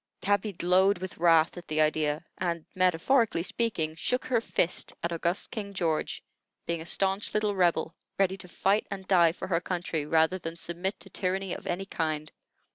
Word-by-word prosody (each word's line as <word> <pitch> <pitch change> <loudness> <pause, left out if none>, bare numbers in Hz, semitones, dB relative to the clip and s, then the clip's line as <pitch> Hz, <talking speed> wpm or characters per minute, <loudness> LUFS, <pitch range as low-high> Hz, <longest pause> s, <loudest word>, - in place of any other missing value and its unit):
Tabby 205 +1 +1
glowed 185 +3 +3
with 185 -1 -7
wrath 165 0 +4
at 175 - -9
the 155 0 -1
idea, 155 0 +1
and 170 -3 -2
(metaphorically 185 +3 +2
speaking) 180 -6 -1
shook 250 +10 -1
her 240 -3 +1
fist 180 -6 -1
at 170 - 0
august 170 +2 -1
King 200 -3 -5
George, 165 -4 -1 0.4
being 170 -1 -2
a 165 - -8
stanch 195 +4 +1
little 210 -1 +1
Rebel, 175 -3 +2 0.2
ready 190 -1 +2
to 185 - -11
fight 195 +4 +1
and 190 -2 -6
die 170 -4 +5
for 180 - -7
her 170 -2 +1
country 170 -5 -2
rather 160 +4 +3
than 165 -1 -6
submit 175 +4 -3
to - - -11
tyranny 190 -1 -2
of - - -7
any 180 +2 -2
kind. 155 -4 -2
180 Hz, 180 wpm, -28 LUFS, 165-195 Hz, 0.4 s, die